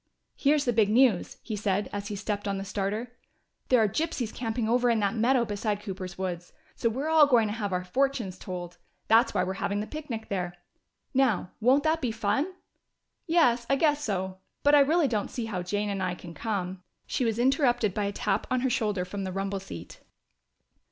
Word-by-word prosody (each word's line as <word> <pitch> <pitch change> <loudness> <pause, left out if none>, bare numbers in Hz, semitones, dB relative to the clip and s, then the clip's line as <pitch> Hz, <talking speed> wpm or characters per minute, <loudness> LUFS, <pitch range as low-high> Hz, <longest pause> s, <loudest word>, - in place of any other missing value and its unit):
"Here's 290 0 +2
the 245 - +2
big 215 -2 +3
news," 230 -4 +3
he 220 - -4
said, 205 -1 0
as 205 0 -4
he 210 - -4
stepped 205 0 -3
on 200 -1 -1
the 195 - -4
starter: 210 +4 -2 0.6
"There 255 - +5
are 220 - +4
gypsies 260 -2 -2
camping 225 -1 -2
over 245 +1 +3
in 230 -2 +3
that 200 0 +1
meadow 240 +2 +3
beside 205 -1 -2
Cooper's 185 -2 -6
woods! 180 -2 -4 0.2
So 230 - +1
we're 265 +7 -3
all 315 -2 +7
going 235 -5 +4
to - - -2
have 210 -3 -3
our 180 0 -1
fortunes 230 -2 -1
told. 175 -1 -7 0.3
That's 225 +1 +5
why 180 - +3
we're 185 +1 -2
having 200 +1 0
the 210 - -2
picnic 255 -6 -6
there. 180 -3 -2 0.6
Now, 245 -9 +2
won't 260 +5 +4
that 320 +1 +1
be 245 - 0
fun?" 225 - 0 0.8
"Yes, 250 -9 +3
I 275 - +4
guess 295 0 +2
so. 190 -4 -2 0.2
But 290 - +5
I 295 - +8
really 305 +2 +4
don't 215 -5 -1
see 240 - -4
how 205 -5 -3
Jane 205 +3 -1
and 195 -1 -3
I 180 -1 -1
can 175 -1 -10
come 190 -3 -3
" - - -50
She - - -1
was 225 -2 0
interrupted 245 - +2
by 205 0 -1
a 200 - -1
tap 205 -1 -1
on 255 -1 +1
her 260 0 +1
shoulder 210 -7 0
from 195 +2 -5
the 190 - -3
rumble 195 +1 -2
seat. 195 - -9
220 Hz, 210 wpm, -28 LUFS, 195-255 Hz, 0.8 s, I